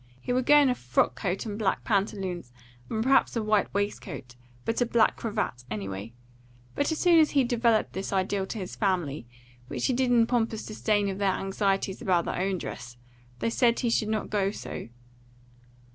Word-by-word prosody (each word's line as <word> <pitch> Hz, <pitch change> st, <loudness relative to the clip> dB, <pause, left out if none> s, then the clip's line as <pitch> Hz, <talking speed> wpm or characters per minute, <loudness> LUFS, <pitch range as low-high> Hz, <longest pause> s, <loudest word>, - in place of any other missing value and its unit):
He 245 Hz, -, -2 dB
would 255 Hz, 0 st, 0 dB
go 295 Hz, -, +8 dB
in 290 Hz, -2 st, +6 dB
a 250 Hz, -, +3 dB
frock 125 Hz, -, +1 dB
coat 180 Hz, -, -3 dB
and 210 Hz, -1 st, -5 dB
black 195 Hz, -3 st, 0 dB
pantaloons, 195 Hz, -, -1 dB, 0.4 s
and 220 Hz, 0 st, -1 dB
perhaps 270 Hz, +1 st, +3 dB
a 230 Hz, -, 0 dB
white 215 Hz, -1 st, +2 dB
waistcoat, 190 Hz, -, -4 dB, 0.3 s
but 225 Hz, +2 st, -1 dB
a -, -, +4 dB
black 230 Hz, -1 st, +3 dB
cravat 205 Hz, -, -3 dB
anyway. 100 Hz, 0 st, -5 dB, 0.6 s
But 285 Hz, -, 0 dB
as 320 Hz, -, -1 dB
soon 345 Hz, -1 st, +5 dB
as 310 Hz, -, +5 dB
he 275 Hz, -2 st, +3 dB
developed 235 Hz, -2 st, +2 dB
this 190 Hz, +1 st, -4 dB
ideal 195 Hz, 0 st, 0 dB
to 225 Hz, -, -5 dB
his 185 Hz, -3 st, -6 dB
family, 170 Hz, -, -1 dB, 0.4 s
which -, -, -3 dB
he 260 Hz, -, +2 dB
did 255 Hz, 0 st, +1 dB
in 235 Hz, -2 st, +5 dB
pompous 230 Hz, -2 st, -1 dB
disdain 210 Hz, -1 st, 0 dB
of 190 Hz, 0 st, -4 dB
their 195 Hz, -2 st, +2 dB
anxieties 195 Hz, 0 st, -1 dB
about 180 Hz, -7 st, +2 dB
their -, -, -2 dB
own 190 Hz, 0 st, 0 dB
dress, 120 Hz, -7 st, -7 dB, 0.4 s
they 230 Hz, -, -1 dB
said 235 Hz, 0 st, +2 dB
he 235 Hz, -, +1 dB
should 215 Hz, -2 st, +1 dB
not 215 Hz, -1 st, -2 dB
go 200 Hz, -2 st, +1 dB
so. 200 Hz, -, -7 dB
205 Hz, 190 wpm, -27 LUFS, 185-235 Hz, 0.6 s, go